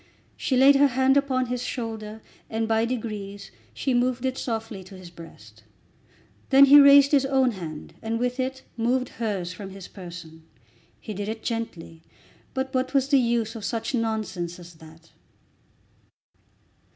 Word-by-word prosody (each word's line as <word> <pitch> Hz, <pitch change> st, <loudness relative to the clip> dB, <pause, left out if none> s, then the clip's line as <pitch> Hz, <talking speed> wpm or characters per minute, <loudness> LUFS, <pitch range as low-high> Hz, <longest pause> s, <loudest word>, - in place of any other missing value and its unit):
She 260 Hz, -, -1 dB
laid 275 Hz, +2 st, +7 dB
her 285 Hz, +1 st, +6 dB
hand 265 Hz, +1 st, +2 dB
upon 265 Hz, -2 st, +1 dB
his 250 Hz, 0 st, -3 dB
shoulder, 220 Hz, -3 st, -5 dB, 0.3 s
and 225 Hz, 0 st, -2 dB
by 225 Hz, 0 st, +2 dB
degrees 210 Hz, -5 st, -5 dB, 0.2 s
she 265 Hz, -, -2 dB
moved 250 Hz, +1 st, 0 dB
it 260 Hz, 0 st, -1 dB
softly 225 Hz, -6 st, -4 dB
to 190 Hz, +1 st, -12 dB
his 180 Hz, -2 st, -12 dB
breast. 110 Hz, -11 st, -14 dB, 0.9 s
Then 275 Hz, +1 st, +8 dB
he 285 Hz, +1 st, +9 dB
raised 280 Hz, 0 st, +7 dB
his 280 Hz, -2 st, +4 dB
own 265 Hz, -2 st, +2 dB
hand 165 Hz, -7 st, -8 dB
and 225 Hz, +1 st, -2 dB
with 250 Hz, +2 st, -2 dB
it 260 Hz, +1 st, -3 dB
moved 245 Hz, +2 st, 0 dB
hers 190 Hz, -5 st, -2 dB
from 195 Hz, +1 st, -8 dB
his 195 Hz, -1 st, -10 dB
person. 170 Hz, -4 st, -11 dB, 0.6 s
He 215 Hz, -, -7 dB
did 205 Hz, +1 st, -4 dB
it 220 Hz, 0 st, -6 dB
gently; 190 Hz, -8 st, -5 dB, 0.5 s
but 265 Hz, +1 st, -3 dB
what 260 Hz, +1 st, -1 dB
was 270 Hz, 0 st, +2 dB
the 280 Hz, -2 st, +5 dB
use 235 Hz, -2 st, 0 dB
of 220 Hz, -, -7 dB
such 230 Hz, +5 st, -3 dB
nonsense 215 Hz, -7 st, -2 dB
as 175 Hz, -1 st, -13 dB
that? 160 Hz, 0 st, -17 dB
225 Hz, 160 wpm, -25 LUFS, 190-260 Hz, 0.9 s, he